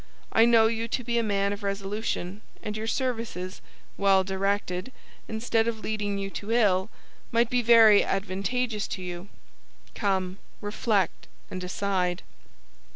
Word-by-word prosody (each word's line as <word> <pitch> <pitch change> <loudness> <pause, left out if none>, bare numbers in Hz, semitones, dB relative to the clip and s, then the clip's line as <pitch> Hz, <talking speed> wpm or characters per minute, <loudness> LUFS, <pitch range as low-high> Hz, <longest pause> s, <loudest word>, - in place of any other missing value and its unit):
I 225 - +6
know 230 -1 +6
you 225 0 0
to 250 +2 -2
be 235 0 0
a - - +1
man 200 -1 +1
of 205 - -7
resolution; 200 -1 -3 0.2
and 210 - -4
your 220 +1 -4
services, 230 -8 -3 0.4
well 195 -1 +4
directed, 190 +2 -1 0.4
instead 225 0 0
of 225 -2 -2
leading 205 -2 -2
you 195 0 -4
to 205 +3 -5
ill, 205 -4 +3 0.4
might 235 0 +2
be 250 -1 +3
very 225 -3 +7
advantageous 210 +4 -1
to 185 - -5
you. 180 +2 -6 0.6
Come; 190 -1 -1 0.2
reflect, 205 -2 -1 0.2
and 185 - -4
decide." 180 -1 -1
205 Hz, 140 wpm, -27 LUFS, 190-225 Hz, 0.6 s, very